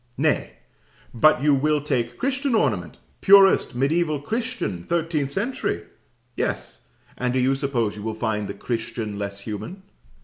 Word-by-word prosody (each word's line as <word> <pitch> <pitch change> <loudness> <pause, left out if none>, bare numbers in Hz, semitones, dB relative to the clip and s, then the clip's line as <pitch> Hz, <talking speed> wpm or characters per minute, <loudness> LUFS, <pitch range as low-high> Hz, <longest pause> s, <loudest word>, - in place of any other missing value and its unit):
Nay, - - +1 0.6
but 135 +2 +4
you 150 -1 +5
will 150 +2 +2
take 125 -5 -2
Christian 270 -1 0
ornament 105 - 0 0.2
purest 195 -8 +6
mediaeval 150 +3 +1
Christian 230 - -3
thirteenth 160 - -1
century! 195 - -2 0.5
Yes: - - -3 0.3
and 125 -1 0
do - - +2
you 130 +2 +3
suppose 135 -6 -1
you 105 - -8
will 110 +1 -3
find 110 -2 -2
the 100 - -5
Christian 110 -1 -4
less 100 0 -4
human? 110 - -7
135 Hz, 140 wpm, -23 LUFS, 110-170 Hz, 0.6 s, purest